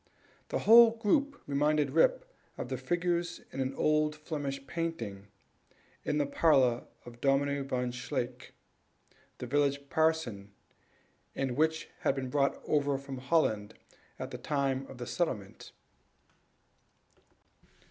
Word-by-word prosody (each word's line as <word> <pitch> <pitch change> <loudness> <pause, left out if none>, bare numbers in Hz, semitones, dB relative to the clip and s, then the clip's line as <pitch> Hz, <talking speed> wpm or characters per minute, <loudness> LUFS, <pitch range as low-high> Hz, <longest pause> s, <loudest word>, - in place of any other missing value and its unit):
The - - 0
whole 230 +1 +9
group 280 +6 +1
reminded 145 0 +1
Rip - - +3 0.3
of - - -5
the - - -2
figures 175 0 -1
in 135 - -7
an 130 0 -1
old 150 0 +2
Flemish 145 -3 -5
painting 125 -12 -4 0.8
in 150 - -1
the 145 - +2
parlor 135 -5 +3 0.2
of 120 0 -12
Dominie 140 +1 +2
Van 125 -2 -2
Shaick, 125 0 -4 0.8
the - - -6
village 140 +1 0
parson, 155 -11 0 0.9
which 155 +5 0
had - - +1
been 130 -2 -4
brought 140 0 +1
over 145 -2 +2
from 135 -1 -7
Holland 125 -7 +1 0.4
at - - -6
the - - -6
time 135 -2 -1
of - - -11
the 120 - -5
settlement. 115 - -3
140 Hz, 120 wpm, -31 LUFS, 130-160 Hz, 0.9 s, whole